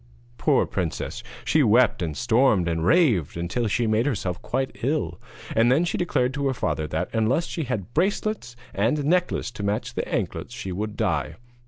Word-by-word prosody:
Poor - - +3
princess! - - -3 0.2
she 155 - +3
wept 120 -2 +4
and 80 -4 -3
stormed 110 - +3
and 80 -1 -1
raved 110 - +3
until 90 +8 -1
she 115 +3 +1
made 110 +3 +2
herself 95 -9 -2
quite 135 0 -2
ill; 120 - -1 0.3
and 115 +2 +4
then 155 +7 +3
she 175 - -2
declared 130 -7 0
to 140 0 -1
her 135 - 0
father 80 -7 -1
that, - - -2
unless 115 +9 +2
she 160 - -4
had 115 -3 -4
bracelets 195 - -1 0.2
and 125 +9 +1
necklace 180 -5 +1
to 110 - -8
match 100 +1 -2
the - - -3
anklets - - -3
she 95 - -5
would 105 +3 -4
die. 80 - 0
115 Hz, 180 wpm, -25 LUFS, 95-140 Hz, 0.3 s, wept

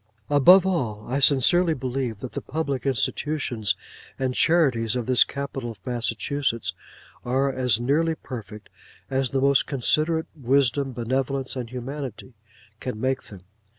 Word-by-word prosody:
Above 175 +7 +7
all, 120 - -2
I 135 +3 -1
sincerely 155 +5 +4
believe 125 -5 -3
that 130 - -6
the - - -5
public 140 -3 -3
institutions 130 -4 0 0.4
and 130 -1 -1
charities 125 -9 +3
of 125 -2 -2
this 130 0 +5
capital 140 -3 -5
of 100 -5 -12
Massachusetts 125 0 -1 0.5
are 135 +3 +1
as 125 -4 +2
nearly 155 +6 +1
perfect, 110 -7 -9 0.4
as 135 -1 +1
the 135 - 0
most 140 0 +3
considerate 155 +4 +1
wisdom, 135 0 +1
benevolence, 130 +3 -2
and 125 -3 -5
humanity, 130 -1 -7 0.5
can 125 -4 -5
make 130 +2 0
them. 95 -3 -12
130 Hz, 135 wpm, -24 LUFS, 120-140 Hz, 0.5 s, Above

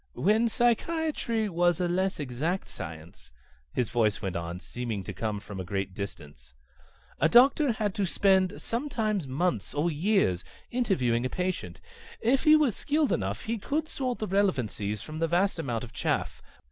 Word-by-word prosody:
"When 220 +4 +3
psychiatry 240 -1 +1
was 175 -2 +2
a 180 - +1
less 185 +1 0
exact 150 +7 -2
science," 80 -4 -9 0.4
his 120 - -1
voice 110 -4 +2
went 95 -4 -4
on, 85 +1 -4
seeming 110 +2 -4
to 100 - -6
come 105 +2 -2
from 100 -1 -8
a - - -3
great 95 +1 -3
distance, 75 -11 -8 0.6
"a - - +4
doctor 260 +2 +6
had 210 -3 -1
to 200 -1 0
spend 190 0 +3
weeks, - - -10
sometimes 220 - -1
months 165 +7 -1
or 160 +4 +1
years 155 - +1 0.3
interviewing 150 - +1
a 130 - -1
patient. 185 +3 -3 0.4
If 260 +6 +2
he 305 0 +8
was 295 -8 +3
skilled 300 0 +1
enough, 100 +3 -1
he 230 0 -2
could 300 +8 -1
sort 255 -5 -2
the 215 - -2
relevancies 125 - 0
from 155 0 -7
the 165 - +2
vast 180 +2 +1
amount 120 -7 -2
of 120 0 -9
chaff. - - -1
175 Hz, 170 wpm, -28 LUFS, -, 0.6 s, he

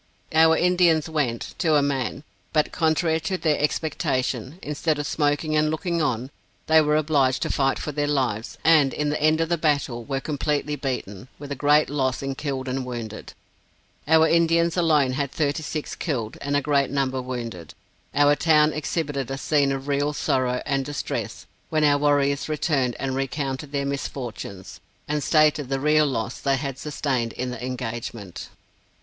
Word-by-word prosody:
Our 160 0 +5
Indians 175 -3 +3
went, 145 -8 -2
to 160 -4 +3
a 145 - +4
man; 135 0 -2 0.3
but 155 -2 +2
contrary 160 0 +1
to 175 +4 -2
their 155 -4 +1
expectation, 135 -3 -1
instead 150 +1 -1
of 145 - -3
smoking 150 +1 0
and 155 0 +3
looking 170 +2 -1
on, 130 -2 -1 0.3
they 160 0 +5
were 150 0 +2
obliged 145 -4 +2
to - - -1
fight 135 -1 +1
for 150 - -4
their 145 0 -1
lives, 125 -7 -1
and 150 -5 +5
in 150 0 0
the 150 - -2
end 155 +1 +3
of 165 - 0
the 170 -2 0
battle 140 -6 0
were 135 +2 -2
completely 150 +1 -1
beaten, 125 -7 -4
with 145 0 -9
a - - -1
great 145 +2 +4
loss 135 -2 -1
in 135 0 -2
killed 135 -2 -4
and 130 +1 -2
wounded. 115 -4 -7 0.7
Our 160 +1 +5
Indians 170 0 +3
alone 155 -7 +3
had 140 +1 -2
thirty 150 +1 -1
six 155 0 -4
killed, 120 -10 -3
and 145 0 0
a - - +1
great 140 -2 +2
number 135 -1 -1
wounded. 115 -10 -6 0.4
Our 145 +1 +5
town 155 -1 +4
exhibited 145 -4 -2
a 135 - -3
scene 140 0 +2
of 135 0 -4
real 145 +1 0
sorrow 125 -3 0
and 135 0 0
distress, 145 +1 -4 0.2
when 155 -1 +1
our 145 -1 +4
warriors 140 0 +2
returned 140 -5 0
and 130 0 -2
recounted 135 +1 -3
their 140 -1 -1
misfortunes, 120 -8 -5 0.3
and 150 -1 -1
stated 150 -3 +3
the 135 0 0
real 150 +1 +3
loss 120 -3 -3
they 140 -1 +1
had 135 0 -4
sustained 135 -6 -2
in 125 0 -3
the 125 -1 -7
engagement. 115 -5 -5
145 Hz, 175 wpm, -24 LUFS, 130-155 Hz, 0.7 s, Our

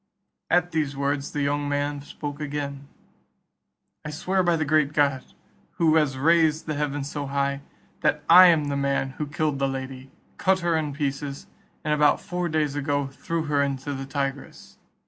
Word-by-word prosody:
At 175 0 +2
these 145 -3 -1
words 140 0 -1
the 145 - -2
young 145 0 0
man 145 0 -1
spoke 145 +1 -7
again, 140 -1 -4 1.2
"I 150 - -5
swear 185 +5 0
by 175 -2 +2
the 155 -1 -1
great 150 -1 +2
God, 140 -3 +2 0.5
who 160 -2 +3
has 145 -4 +1
raised 160 +1 +3
the 155 - -2
heavens 145 -1 -2
so 145 -2 -4
high, 140 0 -1 0.4
that - - +1
I 185 0 +10
am 160 -4 +4
the 140 - -1
man 140 -1 0
who 150 - -2
killed 150 -1 -1
the 135 - +1
lady, 130 0 -6 0.3
cut 190 0 +2
her 170 -1 +1
in 155 -2 -1
pieces, 140 -1 -3 0.4
and 150 -2 +1
about 150 -1 +4
four 180 -1 -3
days 155 -3 0
ago 145 0 0
threw 160 +4 -4
her 145 -2 +1
into 140 0 -2
the 135 0 -6
Tigris. 140 0 -5
145 Hz, 175 wpm, -25 LUFS, 140-155 Hz, 1.2 s, I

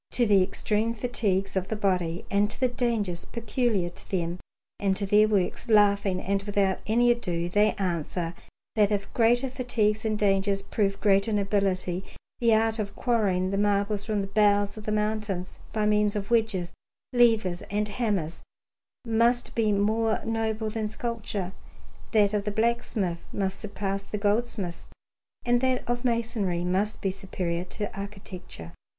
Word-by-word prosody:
To 245 - +3
the 200 -3 +5
extreme 210 +4 0
fatigues 200 -5 -1
of 190 -1 0
the 220 - -2
body 180 -4 0
and 205 +1 +3
to - - -8
the 255 - +3
dangers 230 -8 -1
peculiar 230 -6 -1
to - - -8
them 175 -2 -2 0.4
and 195 -2 +1
to 200 - 0
their 210 +2 +5
works, 205 +3 0
laughing 200 -3 +4
and 195 +1 -1
without 200 -1 0
any 240 +3 +4
ado 175 -8 -1
they 210 +3 +3
answer 170 -2 -2 0.4
that 210 -2 +4
if 205 -1 -2
greater 240 +3 +3
fatigues 225 -5 0
and 215 -1 0
dangers 195 -1 +1
prove 195 -2 -1
greater 200 +1 +3
nobility, 195 -3 0 0.4
the 235 -1 +3
art 220 0 +3
of 200 -1 -3
quarrying 195 -6 +1
the 195 - 0
marbles 205 0 +1
from 210 -1 -1
the - - -2
bowels 205 0 +3
of 215 -1 -5
mountains 210 -3 -2
by 215 -1 0
means 210 0 +2
of 205 +1 -4
wedges, 220 -7 +1 0.4
levers, 225 -7 +3
and 210 +1 0
hammers 205 -8 -1 0.6
must 235 +2 +2
be 220 -2 +2
more 220 +2 +1
noble 220 -1 -1
than 215 -1 -2
sculpture, 210 -4 -4 0.6
that 210 -2 +4
of 205 -1 0
the - - 0
blacksmith 220 -5 0
must 195 -1 -2
surpass 200 -2 -3
the 210 - -5
goldsmith's, 205 -3 -1 0.6
and 240 0 +3
that 260 -1 0
of 240 +1 -1
masonry 225 -7 0
must 190 +4 0
be 195 - +1
superior 180 -2 -3
to 205 +3 -6
architecture. 195 - -8
205 Hz, 155 wpm, -27 LUFS, 195-225 Hz, 0.6 s, the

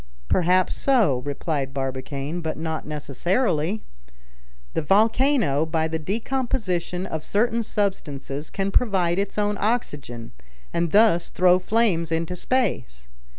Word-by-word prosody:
"Perhaps 180 +1 +3
so," 220 - +2
replied 140 -1 -3
Barbicane, 135 +4 -3
"but 160 -1 -3
not 160 -1 -4
necessarily. 170 - -1 0.9
The - - 0
volcano, 215 - +3
by 160 0 0
the 160 0 -3
decomposition 200 - -2
of 160 -5 -4
certain 230 +5 +1
substances, 155 -9 -3
can 195 0 -2
provide 190 -6 +2
its 200 +1 -2
own 205 0 +1
oxygen, 145 - -2 0.4
and 170 -1 0
thus 205 -5 +4
throw 180 0 +4
flames 185 -5 +1
into 165 +2 -1
space. 175 - -1
175 Hz, 115 wpm, -24 LUFS, 150-210 Hz, 0.9 s, thus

